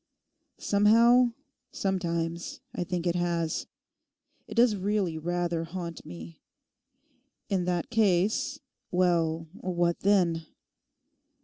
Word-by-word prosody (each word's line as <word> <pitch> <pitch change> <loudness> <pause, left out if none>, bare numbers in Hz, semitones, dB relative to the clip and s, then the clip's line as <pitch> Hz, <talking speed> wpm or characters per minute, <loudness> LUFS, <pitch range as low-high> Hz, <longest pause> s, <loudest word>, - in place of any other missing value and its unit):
Somehow, 230 +4 +4 0.4
sometimes 170 -3 -2
I - - -2
think 175 -1 -3
it 175 - +2
has. 170 -2 -1 0.8
It - - -8
does 235 -2 +5
really 195 -3 0
rather 175 0 -1
haunt 170 -1 -7
me. 85 -1 -10 1.1
In 185 -3 0
that 180 +3 -1
case—well, 180 -5 0
what 175 -3 -1
then? 175 -5 +2
175 Hz, 90 wpm, -28 LUFS, 170-200 Hz, 1.1 s, does